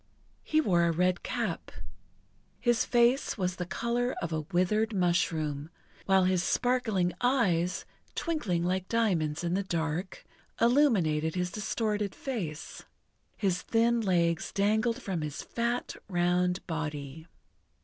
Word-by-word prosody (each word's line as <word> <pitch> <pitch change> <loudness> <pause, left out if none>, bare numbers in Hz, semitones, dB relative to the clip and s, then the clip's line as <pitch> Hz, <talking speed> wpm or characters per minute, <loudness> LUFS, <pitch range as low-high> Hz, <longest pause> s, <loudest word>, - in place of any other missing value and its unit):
He 310 - +1
wore 175 - +3
a 170 - +3
red 180 +2 +1
cap. - - -3 0.9
His 240 0 +2
face 240 +2 +3
was 180 -2 -1
the 180 - -4
colour 240 +5 -1
of 170 -1 -3
a 155 - 0
withered 195 +7 0
mushroom, 160 -5 0 0.4
while 190 -1 +5
his 185 -1 +2
sparkling 220 -9 +1
eyes, 180 -9 +1 0.3
twinkling 230 - -1
like 185 +1 -1
diamonds 175 -10 +1
in 170 0 0
the 195 - +1
dark, 170 0 -3 0.3
illuminated 195 - +3
his 180 0 -1
distorted 210 0 -2
face. 180 - -5 0.6
His 190 -4 0
thin 235 +1 +2
legs 170 -4 +1
dangled 220 +3 +1
from 185 -5 -2
his 150 -1 -4
fat, 235 +1 -2
round 180 0 +1
body. 155 -2 -5
185 Hz, 125 wpm, -29 LUFS, 170-230 Hz, 0.9 s, while